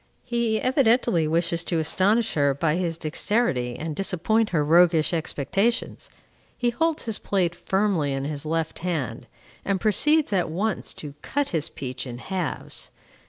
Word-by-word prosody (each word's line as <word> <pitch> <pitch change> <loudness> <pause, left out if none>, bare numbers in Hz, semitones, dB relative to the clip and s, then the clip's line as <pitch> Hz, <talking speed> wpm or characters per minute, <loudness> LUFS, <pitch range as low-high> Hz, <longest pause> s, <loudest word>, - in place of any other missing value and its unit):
He 235 -3 0
evidently 240 - +2
wishes 170 +1 +1
to 170 - 0
astonish 200 +8 +2
her 140 -2 +2
by 155 +2 +1
his 170 -2 -1
dexterity, 155 - 0
and 160 -1 -4
disappoint 195 +5 +1
her 150 -4 +1
roguish 170 0 +4
expectations. 185 - -1 0.5
He 240 -1 +1
holds 325 +5 0
his 225 -2 -3
plate 180 -4 0
firmly 190 -6 0
in 135 0 -2
his 145 -1 -3
left 160 +1 -2
hand, 155 -10 -3 0.4
and 195 -1 0
proceeds, 290 +6 +3
at 180 -3 +1
once, 195 +5 -2
to 145 -2 -8
cut 285 -1 -1
his 160 -3 -1
peach 130 0 -6
in 120 -1 -6
halves. 180 +5 -4
175 Hz, 150 wpm, -25 LUFS, 155-220 Hz, 0.5 s, roguish